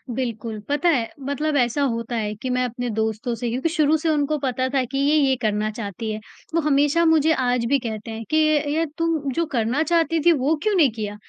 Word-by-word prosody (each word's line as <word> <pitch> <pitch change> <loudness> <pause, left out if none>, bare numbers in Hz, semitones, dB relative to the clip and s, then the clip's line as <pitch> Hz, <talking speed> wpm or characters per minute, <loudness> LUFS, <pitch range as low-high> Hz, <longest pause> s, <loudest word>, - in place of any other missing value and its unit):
बिल्कुल, 225 -3 -4
पता 295 +4 +2
है, 240 -8 +1
मतलब 285 +3 -2
ऐसा 245 +2 +1
होता 235 -3 -1
है 210 -2 -2
कि 245 +5 -5
मैं 250 0 +1
अपने 245 +1 -4
दोस्तों 220 +2 -2
से 240 +1 -3
क्योंकि 255 +7 -1
शुरू 310 -1 +2
से 320 +1 -1
उनको 300 0 +1
पता 255 -1 -1
था 270 -2 +2
कि 275 - -2
ये 285 +2 +3
ये 275 -3 +3
करना 215 -1 0
चाहती 215 0 -5
है। 215 - -4 0.4
वो 335 - +3
हमेशा 295 +2 +2
मुझे 320 -1 +4
आज 250 -4 0
भी 280 0 +3
कहते 225 -2 -6
हैं 225 0 -6
कि 310 - +2
ये 310 -1 +4
ये 325 +2 +1
तू 325 -4 -1
जो 335 +6 0
करना 240 +3 0
चाहती 330 0 +1
थी 345 - +7
वो 295 0 +2
क्यों 430 - +1
नहीं 305 -9 +4
किया? 210 -2 -5
265 Hz, 230 wpm, -22 LUFS, 230-310 Hz, 0.4 s, थी